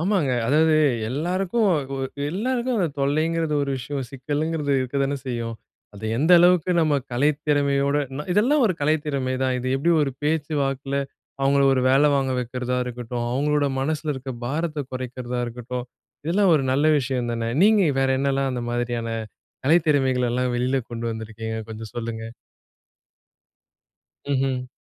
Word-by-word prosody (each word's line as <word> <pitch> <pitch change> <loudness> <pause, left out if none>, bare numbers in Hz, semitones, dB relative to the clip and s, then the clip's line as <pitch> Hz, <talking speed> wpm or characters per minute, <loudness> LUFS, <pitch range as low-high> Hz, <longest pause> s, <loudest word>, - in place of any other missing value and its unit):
ஆமாங்க. 180 -5 +1 0.2
அதாவது 155 +4 +4 0.3
எல்லாருக்கும் 185 - 0 0.4
அது 140 +2 -4
எல்லாருக்கும் 245 +5 -1
அந்த 180 -4 +1
தொல்லைங்கிறது 155 +3 +1
ஒரு 140 - -2
விஷயம் 135 +1 -4
சிக்கலங்கிறது 145 +2 -2
இருக்கதானே 140 +2 -1
செய்யும். 115 -2 -3 0.4
அது 100 +2 -9
எந்த 155 +8 +3
அளவுக்கு 180 0 +4
நம்ம 155 -2 +2 0.2
கலை 140 +5 +3 0.2
திறமையோட 140 -1 +2 0.2
ந - - -2
இதெல்லாம் 255 +9 +3
ஒரு 185 - 0
கலை 150 +2 +3
திறமை 135 -3 -1
தான். 130 -1 +1
இது 125 - -5
எப்பிடி 145 +6 +1
ஒரு 140 - 0
பேச்சு 155 0 0
வாக்கில 135 0 -2 0.5
அவுங்கள 140 +1 +3
ஒரு 130 - +2
வேல 140 +3 +5
வாங்க 135 -1 +1
வைக்கிறதா 125 +1 -2
இருக்கட்டும். 120 -1 -4
அவுங்களோட 145 +2 +1
மனசில 155 +2 -1
இருக்கிற 130 -1 -6
பாரத்த 150 +2 -2
குறைக்கிறதா 125 -1 -4
இருக்கட்டும். 125 +1 -5 0.4
இதெல்லாம் 185 +3 +3
ஒரு 150 - +2
நல்ல 145 +3 +2
விஷயம் 125 -2 -2
தானே! 115 0 -2 0.2
நீங்க 210 -1 +5 0.2
வேற 135 0 +2
என்னெல்லாம் 135 0 0
அந்த 125 -1 -3
மாதிரியான 120 -1 -2 0.6
கலை 160 +6 +6
திறமைகள் 130 -4 +2
எல்லாம் 125 +1 0
வெளில 130 +2 +1
கொண்டு 115 0 -5
வந்திருக்கீங்க. 110 0 -6
கொஞ்சம் 110 -2 -8
சொல்லுங்க. 115 -1 -4 2.1
ம்ஹ்ம். 130 -2 0
135 Hz, 145 wpm, -23 LUFS, 125-155 Hz, 2.1 s, கலை